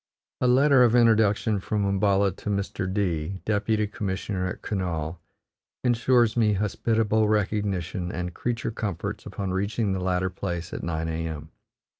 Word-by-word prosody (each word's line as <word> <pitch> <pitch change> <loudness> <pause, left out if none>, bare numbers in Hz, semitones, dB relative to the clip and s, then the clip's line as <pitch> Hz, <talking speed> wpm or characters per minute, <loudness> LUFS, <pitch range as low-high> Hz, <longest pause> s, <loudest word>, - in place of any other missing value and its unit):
A 125 - +2
letter 135 +1 +5
of 120 -1 +4
introduction 110 -2 +3
from 105 +1 -1
Umballa 100 0 +2
to - - -5
Mr. 100 -2 -2
D, 95 -2 -1
deputy 105 0 +1
commissioner 100 -3 -3
at 90 - -6
Kurnaul, 85 -5 -3 0.6
insures 120 -1 +3
me 110 -3 +3
hospitable 110 +1 +1
recognition 100 -4 -1
and 90 0 -4
creature 120 +2 -2
comforts 100 -6 -4
upon 95 -2 -4
reaching 100 +3 0
the 95 - -2
latter 90 0 0
place 85 -2 -4
at - - -4
9 80 -1 -2
a.m. 80 -1 -4
100 Hz, 140 wpm, -26 LUFS, 90-110 Hz, 0.6 s, letter